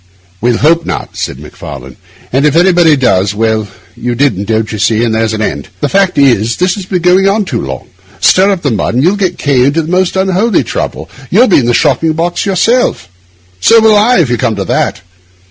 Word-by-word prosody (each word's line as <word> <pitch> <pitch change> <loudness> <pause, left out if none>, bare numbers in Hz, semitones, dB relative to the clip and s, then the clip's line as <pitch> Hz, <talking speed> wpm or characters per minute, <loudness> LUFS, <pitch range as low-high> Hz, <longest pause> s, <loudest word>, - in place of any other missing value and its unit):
'We'll 120 0 +1
hope 165 +4 +2
not,' - - -5
said - - -4
Macfarlane, 65 -3 -10 0.4
'and 135 +2 +1
if 150 - 0
anybody 175 -2 +4
does—well, 110 -2 0 0.3
you 120 0 -3
didn't, 125 -7 0
don't 110 0 -1
you 110 - -5
see, 110 +2 +1
and 115 -2 0
there's 110 0 -1
an 110 0 -2
end. 70 -8 -4
The 145 - -1
fact 195 +1 +1
is, 120 -5 +2
this 180 +1 +1
has 195 -3 -7
been 180 -3 -2
going 185 +2 +3
on 205 +1 0
too 125 -10 -3
long. 65 -1 -7 0.3
Stir 190 +2 +3
up 190 -3 -2
the 145 - 0
mud, 110 +1 -2
and 130 - +1
you'll 180 +5 +2
get 185 -3 -2
K— 135 -3 +1
into 155 +4 0
the 160 - -6
most 185 0 0
unholy 190 - +1
trouble; - - -5 0.2
you'll 225 +8 +4
be 190 - +4
in 120 -3 -1
a - - +2
shocking 155 +2 +1
box 170 +4 -2
yourself. 220 - 0 0.5
So 230 - +5
will 220 -1 +4
I, 220 +5 +3
if 155 -9 +1
you 120 - 0
come 110 -1 -1
to 100 -1 -4
that. - - -1
145 Hz, 215 wpm, -11 LUFS, 115-185 Hz, 0.5 s, So